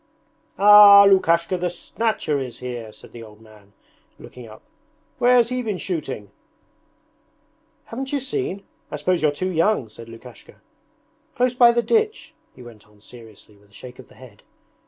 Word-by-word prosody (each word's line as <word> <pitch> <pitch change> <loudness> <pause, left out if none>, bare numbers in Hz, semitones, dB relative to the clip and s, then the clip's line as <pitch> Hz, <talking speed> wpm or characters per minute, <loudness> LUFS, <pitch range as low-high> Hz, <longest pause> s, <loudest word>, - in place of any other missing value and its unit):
'Ah! 205 0 +8
Lukashka 175 -2 +1
the 180 0 -2
Snatcher 175 -4 -3
is 130 -3 -8
here!' 120 -3 -8
said - - -17
the 120 - -12
old 105 -1 -15
man, 105 -2 -21 0.4
looking 125 -2 -14
up. 110 0 -16 0.6
'Where 245 +1 +3
has 235 -2 +2
he 255 0 -3
been 215 -5 -4
shooting?' 145 - -6 1.5
'Haven't 265 +3 -7
you 285 - -1
seen? 270 - -5 0.3
I - - -6
suppose 175 +4 -2
you're 155 - +2
too 185 +6 -4
young!' 165 - -1
said 115 +2 -14
Lukashka. 115 +1 -15 0.8
'Close 250 0 0
by 245 -1 +5
the 235 0 -1
ditch,' 440 - -2 0.2
he 125 - -14
went 115 -4 -16
on 105 0 -26
seriously 110 -1 -17
with 100 0 -27
a - - -28
shake 125 +3 -13
of 130 - -14
the - - -21
head. 125 -6 -17
160 Hz, 165 wpm, -21 LUFS, -, 1.5 s, Ah